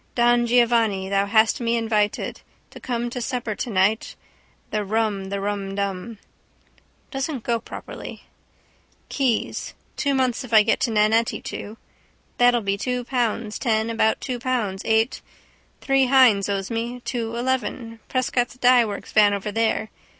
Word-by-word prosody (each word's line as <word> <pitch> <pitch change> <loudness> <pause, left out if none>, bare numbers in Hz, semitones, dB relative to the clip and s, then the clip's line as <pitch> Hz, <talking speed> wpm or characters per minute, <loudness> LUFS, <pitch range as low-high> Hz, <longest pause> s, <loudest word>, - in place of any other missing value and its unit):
Don 240 0 +3
Giovanni, 230 -5 +2
thou 200 0 +1
hast 220 +3 +3
me 235 0 +1
invited 215 -2 -1 0.3
To - - -11
come 240 -1 -3
to 250 - -4
supper 240 -2 -3
tonight, 205 0 0 0.6
The 210 -1 -1
rum 210 -1 -1
the 200 0 -3
rumdum. 200 +1 -3 0.9
Doesn't 270 -2 -3
go 235 -1 0
properly. - - -9 0.9
Keyes: 260 -5 -1 0.2
two 280 -1 +1
months 260 0 0
if 245 -2 -9
I 215 - +8
get - - +1
Nannetti 220 +1 +2
to. 215 +2 -7 0.6
That'll 245 -1 +5
be 200 -1 -1
two 250 +1 -2
pounds 235 -3 -2
ten 220 -1 0
about 220 -1 +1
two 250 -2 -4
pounds 230 -7 -2
eight. 225 +2 +1 0.6
Three 270 -1 +2
Hynes 245 -7 +5
owes 195 +1 -2
me. 235 +2 -3
Two 235 -2 -3
eleven. 235 -2 -2
Prescott's 250 -1 -1
dyeworks 245 -5 +2
van 205 -2 +5
over 200 +1 -4
there. 220 0 0
230 Hz, 135 wpm, -23 LUFS, 210-245 Hz, 0.9 s, I